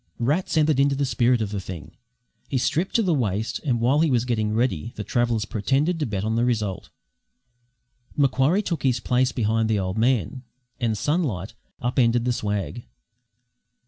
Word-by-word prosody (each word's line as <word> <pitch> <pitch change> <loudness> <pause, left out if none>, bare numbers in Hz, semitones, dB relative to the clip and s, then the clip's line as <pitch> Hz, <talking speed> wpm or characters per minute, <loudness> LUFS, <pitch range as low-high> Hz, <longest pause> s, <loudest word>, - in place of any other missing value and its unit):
Rats 150 +8 0
entered 155 -3 +3
into 140 0 +3
the 140 +1 0
spirit 120 -1 +2
of 100 - -5
the 100 - -2
thing; 90 -4 -8 0.6
he 135 - 0
stripped 165 +8 0
to 230 - +4
the 180 -4 +2
waist, 110 -5 -1
and 125 -6 0
while 130 +5 +3
he 160 0 +3
was 125 -3 +1
getting 110 -3 0
ready 115 -2 -1
the 105 - -4
travellers 120 -2 0
pretended 135 - 0
to 150 - -1
bet 100 -3 -3
on 110 +1 -1
the 115 - +2
result. 110 -6 -1 1.3
Macquarie 140 +7 +2
took 170 -6 -2
his 130 -3 +1
place 125 +2 +1
behind 110 -1 0
the 110 - +2
old 95 +2 -2
man, 125 0 +1 0.4
and 115 -4 0
Sunlight 115 - -1 0.3
up 120 +3 -1
ended 120 -1 +3
the 125 - +1
swag. 105 +2 -3
120 Hz, 175 wpm, -24 LUFS, 110-135 Hz, 1.3 s, to